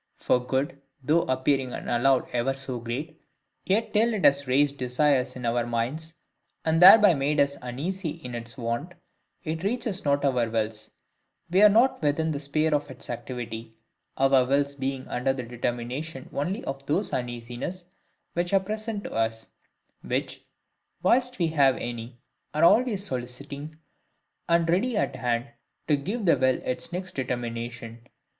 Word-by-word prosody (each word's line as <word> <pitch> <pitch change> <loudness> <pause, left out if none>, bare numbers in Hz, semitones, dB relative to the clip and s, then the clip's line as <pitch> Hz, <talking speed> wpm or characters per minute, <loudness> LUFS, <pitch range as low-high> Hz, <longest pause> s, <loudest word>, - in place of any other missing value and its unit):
For 125 - +1
good, 135 +2 -2 0.2
though 155 +5 +3
appearing 130 0 +1
and - - -6
allowed 125 +2 +2
ever 125 +2 0
so 130 -2 -5
great, 130 +7 -5 0.5
yet 210 +4 +1
till 225 +1 +3
it 200 - 0
has 140 0 +4
raised 140 +2 +2
desires 130 0 +1
in 125 -1 -6
our 120 +1 +1
minds, 125 +8 -3 0.5
and 160 +1 +2
thereby 195 +1 +9
made 145 +1 0
us 140 0 +3
uneasy 160 +9 -3
in 150 -5 -7
its 115 -1 -5
want, 120 +8 -3 0.5
it 160 -1 -3
reaches 210 -1 -2
not 140 0 +1
our 125 -4 +1
wills; 110 -1 -2 0.6
we 185 +3 +4
are 210 - +9
not 235 +6 +3
within 155 +2 +1
the 145 - -3
sphere 155 +2 0
of 145 0 0
its 130 - -8
activity, 115 -2 -6 0.4
our 135 -1 +5
wills 140 +2 +1
being 135 -1 -4
under 130 +2 0
the 130 -2 -5
determination 125 +4 -4
only 185 - -2
of 135 0 -5
those 185 +8 0
uneasinesses 120 +8 -4 0.5
which 175 +2 -1
are - - +6
present 215 +1 -4
to - - -6
us, 110 0 -1 0.5
which - - -3 0.6
(whilst 250 +5 +2
we 175 - +2
have 140 -5 +3
any) 120 0 -6 0.4
are 155 - +2
always 210 +2 +4
soliciting, 140 +4 -6 0.7
and 170 0 +3
ready 205 +8 +1
at - - 0
hand, 120 -1 -1 0.4
to 150 - +4
give 200 +10 -3
the 170 - +5
will 130 -1 +2
its 125 - -3
next 185 +1 -4
determination. 120 -2 -4
140 Hz, 155 wpm, -26 LUFS, 125-165 Hz, 0.7 s, thereby